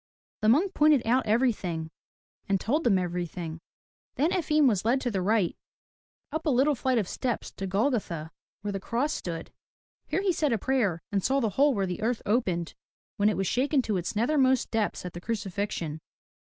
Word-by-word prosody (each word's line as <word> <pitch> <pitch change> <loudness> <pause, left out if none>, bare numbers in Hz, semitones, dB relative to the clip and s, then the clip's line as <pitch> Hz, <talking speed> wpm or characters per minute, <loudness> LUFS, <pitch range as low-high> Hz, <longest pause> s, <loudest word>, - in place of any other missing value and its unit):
The 215 - +3
monk 330 - +3
pointed 300 -4 +4
out 245 +1 +2
everything 200 -9 0 0.6
and 195 -1 +2
told 290 - 0
them 200 -5 +4
every 175 -1 -2
thing. 165 -1 -7 0.5
Then 310 +5 +2
Efim 305 -5 +3
was 205 -7 +2
led 240 +4 +2
to 245 - -1
the 195 -3 -1
right, 200 -2 +1 0.8
up 315 +2 -3
a - - +4
little 275 +3 +3
flight 260 -1 0
of 210 -5 0
steps 245 +2 -3
to 195 - -5
Golgotha, 195 - -1 0.3
where 205 - -2
the 195 - -3
cross 245 +9 -1
stood. 165 -2 -5 0.6
Here 385 - -1
he 380 -3 +2
said 300 -5 +1
a - - +2
prayer, 205 -8 0
and 200 -2 0
saw 270 +1 +2
the 225 -5 +1
hole 280 +4 +3
where 195 -1 +1
the 180 +2 -4
earth 230 +1 -1
opened 185 -7 0 0.4
when 205 +1 +4
it 215 - -1
was 195 - 0
shaken 265 - +1
to 210 -4 -1
its 180 +4 -3
nethermost 260 +2 +2
depths 215 -4 -1
at 180 - -6
the 175 - -7
crucifixion. 195 -7 -3
220 Hz, 195 wpm, -28 LUFS, 185-265 Hz, 0.8 s, pointed